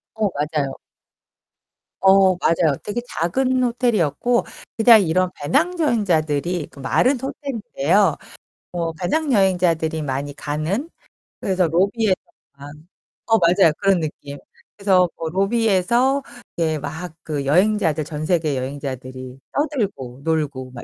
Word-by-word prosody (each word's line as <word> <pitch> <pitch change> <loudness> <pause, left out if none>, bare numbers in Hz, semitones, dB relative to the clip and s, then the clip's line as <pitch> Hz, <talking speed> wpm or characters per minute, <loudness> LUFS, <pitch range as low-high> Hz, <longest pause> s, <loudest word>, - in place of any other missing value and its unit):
어 215 -2 +1
맞아요. 150 -1 -1 1.3
어 190 -1 +5
맞아요. 165 -3 +2
되게 225 +4 -3
작은 255 +10 0
호텔이었고 240 - +1 0.3
그냥 225 -1 +7
이런 185 +2 +1
배낭 300 - 0
여행자들이 175 - 0
그 - - -15
말은 250 - +2
호텔인데요. 210 - 0 0.6
뭐 170 -2 -2
배낭 280 - 0
여행자들이 175 -6 +1
많이 140 +1 -3
가는 155 - -3 0.5
그래서 185 -2 +1
로비에서 195 +4 +2 0.4
방 140 +1 -11 0.6
어 225 - +7
맞아요 175 -1 +4
그런 195 -3 +2
느낌. 145 -2 -6 0.4
그래서 190 -3 +3
뭐 165 -1 -4
로비에서 225 - +1 0.3
이렇게 160 -2 0
막 155 +4 -6
그 145 -3 -4
여행자들, 175 0 +2
전 150 0 -5
세계 155 -5 0
여행자들이 130 -1 -6
떠들고 200 - -3
놀고 145 -5 -2
막 120 - -9
175 Hz, 275 characters per minute, -21 LUFS, 150-215 Hz, 1.3 s, 그냥